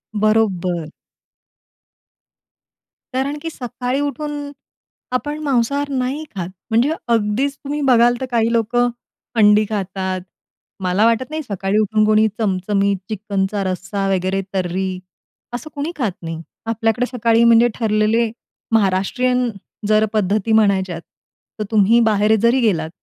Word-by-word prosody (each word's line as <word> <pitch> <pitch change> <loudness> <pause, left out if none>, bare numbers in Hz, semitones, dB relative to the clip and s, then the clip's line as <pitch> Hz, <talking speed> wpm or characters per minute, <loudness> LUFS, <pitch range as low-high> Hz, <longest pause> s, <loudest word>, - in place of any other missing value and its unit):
बरोबर. 190 -6 +1 2.2
कारण 275 +3 -1
की 325 - -4
सकाळी 250 -1 -3
उठून 290 +1 -3 0.6
आपण 295 +4 -2
मांसाहार 280 +2 0
नाही 265 +2 -2
खात. 185 -2 -3 0.2
म्हणजे 235 +6 +3 0.2
अगदीच 230 +6 0
तुम्ही 290 +1 -3
बघाल 240 -1 +5
तर, - - -1
काही 230 -1 +2
लोकं 240 +2 +2 0.5
अंडी 210 0 +6
खातात. 190 -2 -3 0.6
मला 185 +4 +2
वाटत 230 +2 +2
नाही 310 +1 -3
सकाळी 200 -2 -1
उठून 215 0 +2
कोणी 215 0 +4
चमचमीत 200 -1 +1
चिकनचा 200 -1 -2
रस्सा 195 +1 -2
वगैरे, 190 +1 0
तर्री 190 0 -1 0.6
असं 250 +6 -5
कोणी 290 +3 -3
खात 230 -9 -1
नाही. 165 -1 -5 0.2
आपल्याकडे 225 +1 0
सकाळी 230 -1 +3
म्हणजे 235 +1 +6
ठरलेले 220 0 +1 0.4
महाराष्ट्रीयन, 235 +5 +2 0.4
जर 215 0 +4
पद्धती 210 +1 +1
म्हणायच्यात 190 -4 0 0.6
तर, - - 0
तुम्ही 220 +2 +5
बाहेर 210 0 +3
जरी 235 +3 +4
गेलात 165 -8 +1
220 Hz, 120 wpm, -19 LUFS, 195-245 Hz, 2.2 s, अंडी